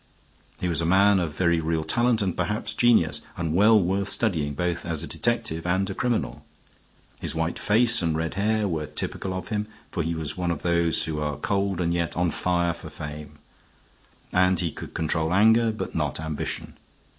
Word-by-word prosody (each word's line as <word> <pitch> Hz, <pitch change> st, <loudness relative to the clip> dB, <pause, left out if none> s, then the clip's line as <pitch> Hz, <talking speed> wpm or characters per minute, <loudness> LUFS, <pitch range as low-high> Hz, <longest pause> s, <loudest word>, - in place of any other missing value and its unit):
He 90 Hz, -, -1 dB
was 85 Hz, -2 st, -1 dB
a -, -, -1 dB
man 100 Hz, +2 st, +5 dB
of 80 Hz, -4 st, -3 dB
very 85 Hz, -2 st, +2 dB
real 80 Hz, 0 st, -1 dB
talent, 120 Hz, +6 st, +2 dB
and 95 Hz, -3 st, -1 dB
perhaps 105 Hz, +4 st, -2 dB
genius, 110 Hz, -11 st, +3 dB, 0.2 s
and 80 Hz, -3 st, -2 dB
well 105 Hz, +4 st, +6 dB
worth 95 Hz, +2 st, 0 dB
studying, 80 Hz, -10 st, 0 dB
both 85 Hz, +2 st, -2 dB
as 85 Hz, -2 st, -3 dB
a -, -, -5 dB
detective 100 Hz, -3 st, -2 dB
and 95 Hz, +2 st, +1 dB
a 95 Hz, -, -4 dB
criminal. 120 Hz, +3 st, -2 dB, 0.8 s
His -, -, -2 dB
white -, -, -2 dB
face 120 Hz, +2 st, +4 dB
and 80 Hz, -2 st, 0 dB
red 80 Hz, 0 st, -2 dB
hair 105 Hz, +2 st, +1 dB
were 80 Hz, -4 st, -2 dB
typical 95 Hz, -, -3 dB
of 95 Hz, 0 st, -5 dB
him, 105 Hz, -1 st, -2 dB, 0.2 s
for 85 Hz, -, -2 dB
he 80 Hz, +1 st, -2 dB
was 80 Hz, -1 st, -3 dB
one 90 Hz, -1 st, -2 dB
of 85 Hz, -3 st, -3 dB
those 85 Hz, -1 st, +2 dB
who 80 Hz, -2 st, -3 dB
are 75 Hz, -2 st, -2 dB
cold 100 Hz, -2 st, -1 dB
and 85 Hz, -1 st, 0 dB
yet 85 Hz, -1 st, -2 dB
on 90 Hz, -1 st, +1 dB
fire 85 Hz, 0 st, 0 dB
for 85 Hz, -, -10 dB
fame; 75 Hz, 0 st, -8 dB, 1.0 s
and 90 Hz, -1 st, +3 dB
he 85 Hz, -3 st, -1 dB
could -, -, -10 dB
control 80 Hz, 0 st, 0 dB
anger, 110 Hz, +3 st, +5 dB
but 110 Hz, -, -5 dB
not -, -, -1 dB
ambition. 80 Hz, -1 st, -4 dB
90 Hz, 190 wpm, -25 LUFS, 80-100 Hz, 1.0 s, well